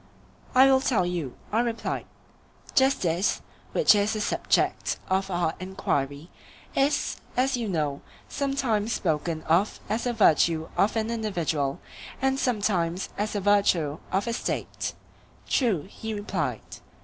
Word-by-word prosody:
I 260 +1 +8
will 265 -1 +5
tell 220 -9 +2
you, 170 -8 -3 0.2
I 220 - +2
replied; 235 -1 -2 0.7
justice, 195 - +2 0.3
which - - +5
is 205 +1 +2
the 215 - -2
subject 210 - +1
of 190 +1 +1
our 175 -3 0
enquiry, 150 -5 -2 0.4
is, 285 +2 +1 0.2
as 265 +1 +2
you 235 -4 -2
know, 150 -5 -1 0.3
sometimes 245 -6 0
spoken 160 -1 -1
of 175 +6 +2
as 220 +3 -1
the 245 - 0
virtue 165 -6 +3
of 205 +3 +2
an 225 0 0
individual, 165 -11 -1 0.4
and 270 0 +1
sometimes 190 -8 0
as 210 +1 -2
the 205 - -1
virtue 185 -7 +2
of 195 +2 +1
a 235 - -1
State. - - -3 0.5
True, 215 - +2
he 220 +2 -6
replied. 205 0 -2
205 Hz, 135 wpm, -26 LUFS, 170-230 Hz, 0.7 s, I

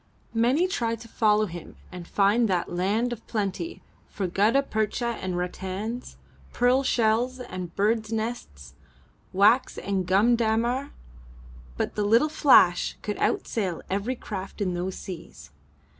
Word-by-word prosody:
Many 250 +10 +2
tried 230 - -2
to 235 - -11
follow 215 -1 +2
him 175 -3 -9 0.2
and 180 -2 -8
find 210 +3 +2
that 180 -2 -1
land 210 +7 0
of 230 - -11
plenty 215 - -3 0.3
for 200 - -3
gutta 210 +9 +2
percha 225 0 -2
and 185 -1 -3
rattans, 190 +6 -5 0.4
pearl 250 +2 +3
shells 245 0 +1
and 180 -8 -7
birds' 215 +2 +1
nests, 215 - -5 0.6
wax 205 +7 +3
and 195 -2 -2
gum 205 +6 +4
dammar, 235 +4 0 0.9
but - - -2
the 210 - -1
little 230 +9 +4
Flash 265 - +4
could 210 - -3
outsail 190 -7 -1
every 205 +7 -1
craft 195 -4 -7
in 190 -3 -1
those 180 +2 -3
seas. 75 - -9
215 Hz, 135 wpm, -26 LUFS, 185-235 Hz, 0.9 s, gum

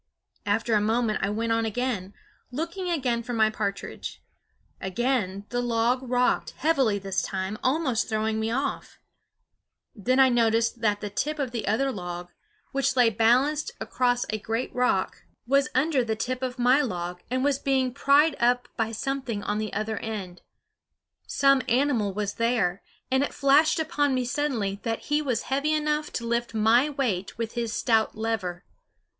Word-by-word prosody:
After 225 +3 +1
a 210 - +4
moment 220 +1 +1
I 200 - 0
went 225 +2 -1
on 225 0 +2
again, 220 -4 -2 0.4
looking 335 +7 -3
again 255 -8 0
for 245 +1 -5
my 220 -1 +3
partridge. 200 -2 -4 0.6
Again 200 -1 -1
the 245 0 -1
log 240 +1 +1
rocked, 250 -1 0
heavily 270 -9 +2
this 195 -1 -2
time, 190 +2 -3
almost 260 -4 +1
throwing 220 0 0
me 220 0 -1
off. 270 +4 -3 1.0
Then 255 +4 0
I 265 - +8
noticed 230 -1 +2
that 210 -2 +1
the 205 - -5
tip 300 +9 -2
of 275 -4 -2
the 235 -4 -4
other 270 +6 +1
log, 175 -4 -6 0.4
which 270 -1 0
lay 245 -3 +5
balanced 260 - +2
across 245 -1 0
a 215 - -2
great 225 +4 -3
rock, 250 -7 0 0.2
was 275 +1 +2
under 270 0 +2
the 220 -2 -1
tip 250 +3 -3
of 255 0 -3
my 250 +4 +4
log 180 -7 -4
and 255 +1 0
was 280 -1 +2
being 260 -2 +1
pried 285 +3 +4
up 245 +1 +2
by 225 -1 -1
something 240 -2 -3
on 210 +1 -1
the 215 -1 -3
other 215 +1 -2
end. 195 -5 -6 0.9
Some 275 -1 +4
animal 245 -5 +2
was 205 +1 -3
there, 215 -6 +1 0.3
and 265 +1 +3
it 285 - -2
flashed 285 +4 +4
upon 295 -4 +1
me 255 -1 0
suddenly 240 -8 -1
that 230 +4 -4
he 300 - +3
was 255 -6 -1
heavy 280 +3 0
enough 300 0 -1
to 235 - -3
lift 235 0 -1
my 230 +6 +4
weight 230 -12 -2
with 225 -1 -3
his 235 -2 -3
stout 225 -2 +1
lever. 205 -6 -3
235 Hz, 165 wpm, -26 LUFS, 215-270 Hz, 1.0 s, I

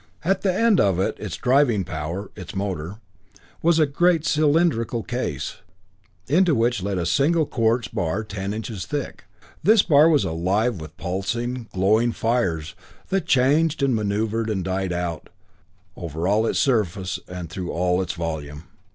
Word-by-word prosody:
At 190 +2 +1
the 195 - +2
end 220 +1 +3
of 95 -3 +2
it, 95 - 0
its - - -5
driving 125 -6 +3
power, 85 +4 -5
its 90 -2 -9
motor, 95 -3 -3 0.7
was 170 0 +3
a 155 - +5
great 165 +3 +2
cylindrical 150 -7 +2
case, 120 - -4 0.7
into 165 +2 +3
which 115 -2 +1
led 100 0 -2
a 85 - -1
single 150 - +2
quartz 115 -2 +1
bar 90 +5 -2
ten 100 -2 -5
inches 110 -2 -5
thick. 145 -2 -5 0.4
This 210 +3 +5
bar 155 0 +5
was 150 -3 +3
alive 95 +5 0
with 80 - -10
pulsing, 115 +6 -3
glowing 110 +5 +2
fires, 95 -11 -1 0.4
that 195 -3 -1
changed 145 +4 +3
and 135 -2 +3
maneuvered 110 +1 -1
and 95 -4 -1
died 95 0 -1
out 85 -2 -3 0.7
over 85 +1 -4
all 110 +3 +2
its - - 0
surface 100 - 0
and 90 -2 -7
through 90 0 -4
all 90 +1 +1
its 90 - -3
volume. 80 -3 -5
110 Hz, 155 wpm, -23 LUFS, 90-140 Hz, 0.7 s, a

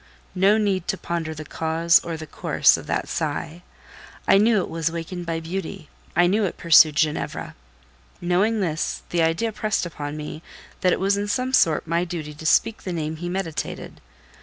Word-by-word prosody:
No 195 +3 +4
need 195 -4 0
to 190 - -1
ponder 165 -3 -4
the 155 0 -8
cause 165 +2 +2
or 165 -1 -4
the 155 - -7
course - - +3
of - - -8
that - - -1
sigh; 160 +2 -3 0.7
I 195 - +6
knew 220 +1 +4
it 185 - 0
was 165 -1 -1
wakened 170 +1 -6
by 165 -1 -1
beauty; 180 0 -6 0.3
I 175 +2 +5
knew 205 +5 +2
it 185 - -4
pursued 160 -2 +6
Ginevra. 155 0 -1 0.7
Knowing 195 +5 +1
this, 165 -3 -2
the 175 - +1
idea 165 +8 +1
pressed 215 -2 -1
upon 150 -3 -6
me 150 +1 -7 0.4
that 180 - +2
it - - +1
was 195 +1 +2
in 205 0 -2
some 255 +5 -1
sort 160 -10 +3
my 170 +1 0
duty 165 -4 -5
to 155 +2 -11
speak 225 +6 +2
the 185 - -5
name 160 -1 -3
he 175 +2 -5
meditated. 175 -4 -5
170 Hz, 185 wpm, -23 LUFS, 160-195 Hz, 0.7 s, I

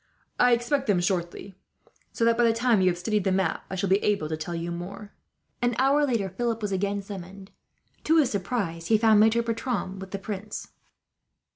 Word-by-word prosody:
I 245 0 +5
expect 245 +3 0
them 200 -4 +3
shortly, 175 +1 -3 0.5
so 230 - 0
that 230 0 +4
by 240 - +2
the 230 -1 +4
time 230 -3 +2
you 185 - +3
have 175 -1 +1
studied 210 +3 -1
the 190 - +1
map, 185 -3 0
I 190 - -4
shall 190 +1 -1
be 195 +2 +2
able 200 -7 0
to 160 - -1
tell 155 +2 -5
you 170 +1 -4
more." 195 +4 -7 0.5
An 245 -1 +1
hour 280 +3 +3
later, 230 -7 0
Philip 230 +4 -2
was 210 -2 -3
again 200 +1 -1
summoned. 195 0 -9 0.5
To 320 +2 +4
his 295 -5 +3
surprise, 190 -5 -3
he 220 - +4
found 220 -1 +5
Maitre 225 +2 +4
Bertram 225 -5 -3
with 190 0 -8
the 200 - -4
prince. 205 +1 -6
200 Hz, 205 wpm, -26 LUFS, 185-230 Hz, 0.5 s, I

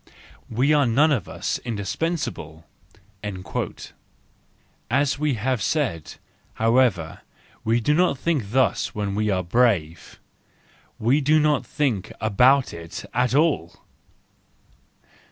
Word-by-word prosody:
We 130 +7 +2
are 145 -3 +3
none 145 +7 +3
of 125 -11 -1
us - - -3
indispensable! 100 - -4 0.6
"—As 115 +6 -5
we 150 -3 0
have 120 +1 -1
said, 95 - -2 0.4
however, 115 -8 +1 0.4
we 115 +2 +2
do 135 +6 +1
not 175 -3 +2
think 140 -10 -1
thus 130 +4 +1
when 100 -2 -2
we 105 +1 0
are 95 -2 0
brave; 90 -5 0 0.8
we 130 +7 +2
do 155 +3 +3
not 150 -1 +1
think 125 -10 -1
about 125 +6 +3
it 85 +1 -8
at 125 +1 +1
all. 145 - +1
120 Hz, 110 wpm, -23 LUFS, 100-145 Hz, 0.8 s, are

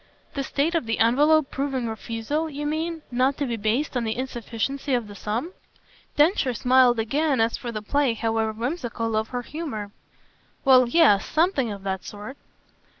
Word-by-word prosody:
"The 280 - -2
state 290 +5 0
of 330 -9 -1
the 225 - 0
envelope 285 +6 +4
proving 270 -3 -2
refusal, 230 +8 -3
you 295 0 -5
mean, 320 +1 -2
not 255 +3 +1
to 285 - -1
be 240 -3 -2
based 225 +7 -1
on 245 - 0
the 220 0 -2
insufficiency 255 +2 -2
of 235 -3 -2
the 205 - -10
sum?" 230 - -4 0.6
Densher 295 - +3
smiled 250 +1 +4
again 275 +5 +1
as 225 +1 +2
for 240 - -5
the 215 -2 -5
play, 275 +1 +1
however 225 -1 0
whimsical, 230 -2 -3
of 220 0 0
her 245 0 -4
humour. 245 -10 -5 0.7
"Well 255 -2 +6
yes 240 -10 +4
something 310 - +1
of 200 -1 -8
that 190 -1 -3
sort." 210 +6 -9
250 Hz, 170 wpm, -24 LUFS, 225-290 Hz, 0.7 s, Well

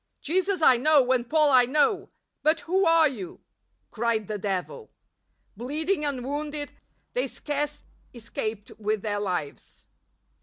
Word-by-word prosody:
" - - -52
Jesus 370 +2 0
I 255 - +7
know 270 -1 +4
and 245 -2 0
Paul 305 -2 +4
I 255 -2 +6
know; 330 - +1 0.3
but 315 +2 +2
who 375 +3 +1
are 330 -1 +6
you 210 - -7 0.2
?" - - -47
cried 225 -2 -1
the 210 -1 -4
devh. 195 - -4 0.7
Bleeding 300 +7 -1
and 265 -4 -3
wounded, 290 +1 -4 0.4
they - - 0
scarce 295 0 -4 0.3
escaped 220 -3 -5
with 215 -1 -1
their 205 -2 -1
lives. 180 -8 -5
275 Hz, 145 wpm, -26 LUFS, 220-310 Hz, 0.7 s, I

